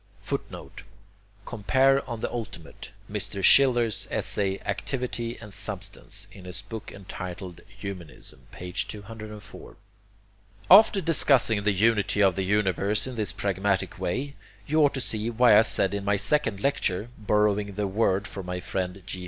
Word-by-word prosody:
[Footnote: -, -, -6 dB, 0.6 s
Compare 130 Hz, +5 st, +2 dB
on 115 Hz, -2 st, -5 dB
the -, -, -2 dB
Ultimate, 110 Hz, -8 st, -7 dB, 0.2 s
Mr. 100 Hz, -1 st, -4 dB
Schiller's 120 Hz, -4 st, +5 dB
essay 95 Hz, -1 st, -1 dB
"Activity 120 Hz, +2 st, -3 dB
and 105 Hz, -3 st, -10 dB
Substance," 100 Hz, -1 st, -4 dB
in 95 Hz, -2 st, -13 dB
his 90 Hz, +2 st, -6 dB
book 110 Hz, 0 st, -8 dB
entitled 90 Hz, -2 st, -8 dB
Humanism, 85 Hz, -9 st, -9 dB
p. 90 Hz, 0 st, -8 dB
204.] 105 Hz, +1 st, -6 dB, 0.9 s
After 200 Hz, 0 st, +8 dB
discussing 135 Hz, -, +4 dB
the 105 Hz, -, +3 dB
unity 105 Hz, 0 st, +2 dB
of 95 Hz, -3 st, +4 dB
the 95 Hz, -, -1 dB
universe 100 Hz, +1 st, +1 dB
in 130 Hz, -, -5 dB
this 110 Hz, -3 st, -2 dB
pragmatic 100 Hz, -1 st, -1 dB
way, 135 Hz, +10 st, -2 dB, 0.3 s
you 155 Hz, +1 st, +3 dB
ought 145 Hz, -, +3 dB
to 135 Hz, -, -2 dB
see 110 Hz, -2 st, -1 dB
why 120 Hz, -1 st, +5 dB
I 105 Hz, -, +8 dB
said 100 Hz, -3 st, +2 dB
in 100 Hz, -1 st, -3 dB
my 100 Hz, +1 st, +2 dB
second 115 Hz, -5 st, +1 dB
lecture, 115 Hz, -6 st, 0 dB
borrowing 105 Hz, -1 st, +1 dB
the 105 Hz, 0 st, -1 dB
word 100 Hz, -1 st, +1 dB
from 95 Hz, -2 st, -7 dB
my 90 Hz, 0 st, -3 dB
friend 90 Hz, +1 st, -4 dB
G. 95 Hz, -, -6 dB
105 Hz, 145 wpm, -26 LUFS, 95-115 Hz, 0.9 s, After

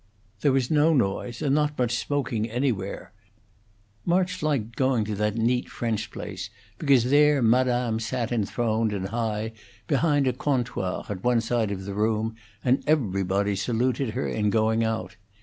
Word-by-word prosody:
There 140 Hz, -, +3 dB
was 130 Hz, 0 st, +1 dB
no 155 Hz, +1 st, +4 dB
noise 120 Hz, +1 st, -1 dB
and 140 Hz, -2 st, +2 dB
not 150 Hz, 0 st, +1 dB
much 120 Hz, -1 st, +1 dB
smoking 120 Hz, -5 st, -1 dB
anywhere; 115 Hz, -5 st, -2 dB, 0.9 s
March 180 Hz, +1 st, +1 dB
liked 130 Hz, -7 st, -1 dB
going 130 Hz, -5 st, +1 dB
to 105 Hz, -, -3 dB
that 105 Hz, +1 st, 0 dB
neat 120 Hz, +2 st, +1 dB
French 110 Hz, -2 st, -2 dB
place 95 Hz, -3 st, -6 dB, 0.3 s
because 135 Hz, -5 st, +3 dB
there 150 Hz, 0 st, +5 dB
Madame 120 Hz, -1 st, +2 dB
sat 115 Hz, +1 st, -2 dB
enthroned 110 Hz, 0 st, 0 dB
and 95 Hz, -1 st, -3 dB
high 110 Hz, -1 st, -2 dB, 0.3 s
behind 145 Hz, -1 st, +2 dB
a 130 Hz, -, +2 dB
'comptoir' 125 Hz, -8 st, -2 dB
at 95 Hz, -3 st, -5 dB
one 125 Hz, -1 st, +3 dB
side 115 Hz, -1 st, 0 dB
of 95 Hz, -1 st, -5 dB
the 100 Hz, -, -4 dB
room, 110 Hz, +2 st, 0 dB, 0.3 s
and 130 Hz, +2 st, +3 dB
everybody 100 Hz, -, +1 dB
saluted 120 Hz, +3 st, -1 dB
her 130 Hz, -, -1 dB
in 105 Hz, -1 st, 0 dB
going 110 Hz, +1 st, +2 dB
out. 110 Hz, -5 st, -3 dB
115 Hz, 155 wpm, -26 LUFS, 105-130 Hz, 0.9 s, there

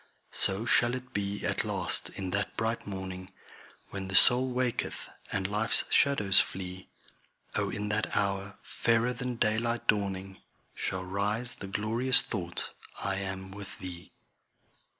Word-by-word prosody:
So 100 Hz, +4 st, +2 dB
shall 120 Hz, +1 st, +3 dB
it 125 Hz, 0 st, -9 dB
be 100 Hz, 0 st, -2 dB
at -, -, 0 dB
last -, -, +1 dB
in 95 Hz, -2 st, -5 dB
that 100 Hz, +2 st, -2 dB
bright 115 Hz, 0 st, -2 dB
morning, 95 Hz, -1 st, -6 dB, 0.6 s
When 100 Hz, -1 st, -5 dB
the 95 Hz, -, -4 dB
soul 125 Hz, +6 st, +7 dB
waketh, 125 Hz, -1 st, -2 dB, 0.2 s
and 95 Hz, -2 st, -2 dB
life's 105 Hz, +3 st, +4 dB
shadows 105 Hz, -9 st, +4 dB
flee; 95 Hz, 0 st, -3 dB, 0.7 s
O -, -, 0 dB
in 105 Hz, 0 st, -4 dB
that 105 Hz, 0 st, -1 dB
hour, 100 Hz, 0 st, -1 dB
fairer 115 Hz, +2 st, +1 dB
than 125 Hz, 0 st, -4 dB
daylight 115 Hz, +1 st, 0 dB
dawning, 95 Hz, -2 st, -1 dB, 0.3 s
Shall 95 Hz, 0 st, -3 dB
rise 105 Hz, +6 st, 0 dB
the 100 Hz, -, -7 dB
glorious 115 Hz, +6 st, +5 dB
thought 85 Hz, -5 st, -4 dB, 0.3 s
I 100 Hz, -1 st, -2 dB
am 95 Hz, -1 st, -5 dB
with 100 Hz, 0 st, -9 dB
Thee. 90 Hz, -2 st, -7 dB
100 Hz, 140 wpm, -29 LUFS, 95-115 Hz, 0.7 s, soul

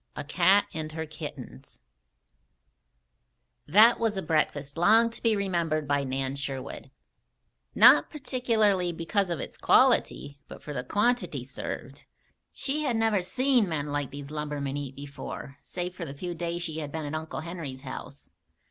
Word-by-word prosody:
A -, -, -4 dB
CAT 185 Hz, +6 st, +4 dB
AND 155 Hz, -2 st, -5 dB
HER 160 Hz, 0 st, -4 dB
KITTENS 145 Hz, -, -9 dB, 1.8 s
That 215 Hz, +9 st, +6 dB
was 225 Hz, -3 st, 0 dB
a 190 Hz, -, -2 dB
breakfast 145 Hz, -3 st, 0 dB
long 220 Hz, +7 st, +5 dB
to -, -, -9 dB
be 225 Hz, -2 st, +3 dB
remembered 170 Hz, -6 st, -1 dB
by 140 Hz, 0 st, +1 dB
Nan 135 Hz, 0 st, -2 dB
Sherwood, 140 Hz, -1 st, -5 dB, 0.9 s
not -, -, +7 dB
particularly 220 Hz, -, +1 dB
because 175 Hz, +4 st, -1 dB
of 170 Hz, -, -2 dB
its -, -, -7 dB
quality, 140 Hz, 0 st, +3 dB
but -, -, -11 dB
for 150 Hz, -, -6 dB
the 125 Hz, -, -3 dB
quantity 235 Hz, -, 0 dB
served. -, -, -7 dB, 0.5 s
She 285 Hz, +3 st, -2 dB
had 270 Hz, -6 st, 0 dB
never 225 Hz, -3 st, +2 dB
seen 240 Hz, +3 st, +2 dB
men 150 Hz, -2 st, -2 dB
like 145 Hz, -2 st, -1 dB
these 140 Hz, 0 st, -9 dB
lumbermen 150 Hz, -2 st, -3 dB
eat 140 Hz, -2 st, -5 dB
before, 140 Hz, -1 st, -8 dB
save 180 Hz, 0 st, -5 dB
for 180 Hz, -2 st, -6 dB
the 140 Hz, -2 st, -8 dB
few 175 Hz, +4 st, -5 dB
days 170 Hz, +1 st, -3 dB
she 160 Hz, -2 st, -4 dB
had 150 Hz, -2 st, -5 dB
been 160 Hz, 0 st, -4 dB
at 145 Hz, -, -5 dB
Uncle 155 Hz, 0 st, -4 dB
Henry's 160 Hz, -6 st, -6 dB
house. 140 Hz, +1 st, -9 dB
160 Hz, 155 wpm, -28 LUFS, 145-200 Hz, 1.8 s, not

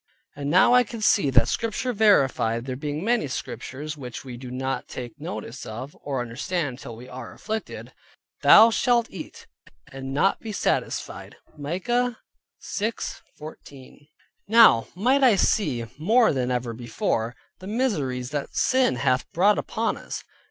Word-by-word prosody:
And 140 Hz, 0 st, -4 dB
now 185 Hz, +8 st, +5 dB
could 240 Hz, 0 st, -6 dB
I -, -, -8 dB
see 200 Hz, -7 st, +3 dB
that 120 Hz, -3 st, +4 dB
Scripture 230 Hz, -, -2 dB
verified 135 Hz, -, +3 dB
(there 130 Hz, -1 st, -4 dB
being 150 Hz, +4 st, -4 dB
many 235 Hz, -7 st, +1 dB
Scriptures 130 Hz, +4 st, -6 dB
which 125 Hz, -3 st, -8 dB
we 125 Hz, -2 st, -7 dB
do 125 Hz, +1 st, -9 dB
not 130 Hz, +1 st, -3 dB
take 125 Hz, +3 st, -8 dB
notice 145 Hz, -7 st, -6 dB
of, 125 Hz, +6 st, -7 dB
or 135 Hz, -3 st, -3 dB
understand 135 Hz, +3 st, -3 dB
till 115 Hz, -, -8 dB
we 120 Hz, +3 st, -11 dB
are 125 Hz, -2 st, -9 dB
afflicted) 220 Hz, +1 st, -6 dB, 0.5 s
"Thou 225 Hz, +2 st, +8 dB
shalt 235 Hz, 0 st, +2 dB
eat 180 Hz, -, -9 dB, 0.5 s
and 135 Hz, 0 st, -7 dB
not 150 Hz, +8 st, +2 dB
be 220 Hz, -, -6 dB
satisfied" -, -, -2 dB, 0.2 s
(Micah 225 Hz, +11 st, -1 dB, 0.5 s
6.14). 150 Hz, -, -7 dB, 0.4 s
Now 220 Hz, -, +6 dB
might 255 Hz, +9 st, +2 dB
I 245 Hz, -5 st, +6 dB
see 135 Hz, -, +1 dB
more 225 Hz, +7 st, +4 dB
than 130 Hz, -2 st, -1 dB
ever 125 Hz, -1 st, -2 dB
before, 115 Hz, 0 st, -2 dB, 0.2 s
the 185 Hz, -, -10 dB
miseries 150 Hz, -, -1 dB
that 145 Hz, -1 st, -4 dB
sin 260 Hz, -, +2 dB
hath 130 Hz, +1 st, 0 dB
brought 200 Hz, +5 st, +4 dB
upon 225 Hz, +1 st, -2 dB
us. -, -, -7 dB
145 Hz, 145 wpm, -25 LUFS, -, 0.5 s, Thou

